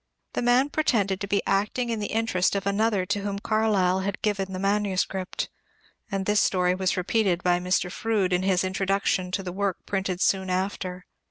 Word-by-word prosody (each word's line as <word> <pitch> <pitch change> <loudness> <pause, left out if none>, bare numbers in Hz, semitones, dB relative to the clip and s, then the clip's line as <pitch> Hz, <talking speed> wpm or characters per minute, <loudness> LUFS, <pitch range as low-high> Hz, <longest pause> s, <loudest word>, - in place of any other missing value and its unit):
The - - -1
man 245 +3 +3
pretended 200 -11 +1
to 200 - -3
be 200 0 +1
acting 210 +5 0
in 225 - -1
the 205 - -2
interest 220 -5 +1
of 200 0 -2
another 200 -1 +1
to 205 +2 -1
whom 200 0 -3
Carlyle 200 -3 +2
had 195 +1 -3
given 195 -2 0
the 185 - -4
manuscript; 195 -1 -1 0.6
and 195 -1 -1
this 210 0 +3
story 180 -1 +2
was 185 0 0
repeated 185 -1 +1
by 175 -1 +3
Mr. 180 0 0
Froude 205 -4 0
in 180 - +2
his 185 -1 +2
Introduction 190 -1 0
to 190 +2 -2
the 180 -1 -5
work 200 -1 -1
printed 190 -2 -2
soon 190 0 +1
after. 185 -1 -2
195 Hz, 185 wpm, -26 LUFS, 185-205 Hz, 0.6 s, man